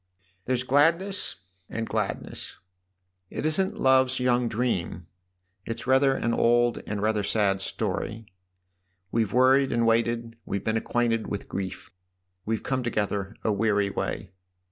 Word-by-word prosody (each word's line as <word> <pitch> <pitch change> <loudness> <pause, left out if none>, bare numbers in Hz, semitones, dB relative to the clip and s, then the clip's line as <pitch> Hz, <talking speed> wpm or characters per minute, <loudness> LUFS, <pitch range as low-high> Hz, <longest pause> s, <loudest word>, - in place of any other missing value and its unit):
" 95 0 -39
There's 125 -1 0
gladness 165 +9 +2 0.3
and 115 -1 -3
gladness. 105 -3 -3 0.7
It - - -4
isn't 190 +7 +1
love's 130 0 +4
young 125 -1 +2
dream; 100 -8 -2 0.6
it's 115 +2 -5
rather 135 +1 +4
an 120 - 0
old 120 +1 +3
and 105 -1 -3
rather 110 0 +2
a - - -1
sad 100 -2 +1
story. 110 +3 -3 0.9
We've 110 -3 +1
worried 130 +3 +4
and 115 -1 +2
waited 115 0 +1
we've 100 - -3
been 110 - 0
acquainted 115 0 0
with 100 - -4
grief. 95 0 -5 0.6
We've 110 -1 -1
come 130 -1 -1
together 105 -3 -2
a 110 - +2
weary 100 -1 +1
way." - - -3
115 Hz, 140 wpm, -26 LUFS, 105-130 Hz, 0.9 s, love's